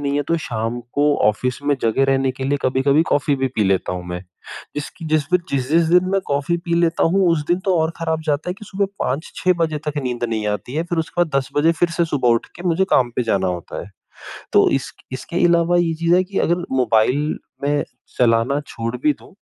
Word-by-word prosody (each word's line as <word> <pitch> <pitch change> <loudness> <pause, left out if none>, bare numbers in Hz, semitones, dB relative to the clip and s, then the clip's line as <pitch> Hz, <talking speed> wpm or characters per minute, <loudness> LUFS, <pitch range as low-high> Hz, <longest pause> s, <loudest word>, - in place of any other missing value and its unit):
नहीं 140 0 -1
है 145 - +1
तो 170 - +2
शाम 115 -1 -3
को 145 0 +3
ऑफ़िस 125 +4 -1
में 145 0 +2
जगे 115 +4 +2
रहने 135 -1 +2
के 130 +1 -6
लिए 140 +2 0
कभी-कभी 135 +4 +3
कॉफ़ी 145 0 +2
भी 135 0 0
पी 110 - +2
लेता 95 -1 +1
हूँ 90 -1 -5
मैं 90 0 -4 0.6
जिसकी 145 +2 -6
जिस 155 -2 +1
पे - - +7
जिस 130 -1 -1
जिस 165 +2 +5
दिन 180 +2 +5
मैं 195 - +2
कॉफ़ी 145 +4 0
पी 170 0 -2
लेता 165 -1 +1
हूँ 190 +3 +3
उस 150 -3 +1
दिन 175 - +2
तो 190 -2 +2
और 160 +1 +1
ख़राब 160 -1 -1
जाता 150 +3 0
है - - -3
कि 215 - -12
सुबह 200 0 -1
5-6 160 +6 0
बजे 155 -2 0
तक 150 0 -2
नींद 125 -1 -2
नहीं 110 -2 -2
आती 105 +6 -4
है। 160 - 0
फ़िर 175 -1 -3
उसके 160 +2 -2
बाद 160 - -11
10 135 -1 0
बजे 160 +3 +4
फ़िर 170 +1 0
से 170 0 +1
सुबह 145 -6 0
उठ 115 -1 +2
के 175 - -9
मुझे 180 +3 +2
काम 125 -2 +3
पे - - +2
जाना 100 -5 0
होता 90 -2 -5
है 100 - -12 0.6
तो - - +5
इस 135 -1 -1 0.2
इसके 170 +7 -2
अलावा 170 0 +3
ये 170 -2 +1
चीज़ 170 +2 +2
है 180 - +4
कि 195 +1 -4
अगर 175 +1 +1
मोबाइल 130 +3 +2 0.2
में 145 +1 +1 0.3
चलाना 120 +3 +3
छोड़ 115 +2 -4
भी 150 - +4
दूँ - - -17
145 Hz, 235 wpm, -20 LUFS, 125-170 Hz, 0.6 s, पे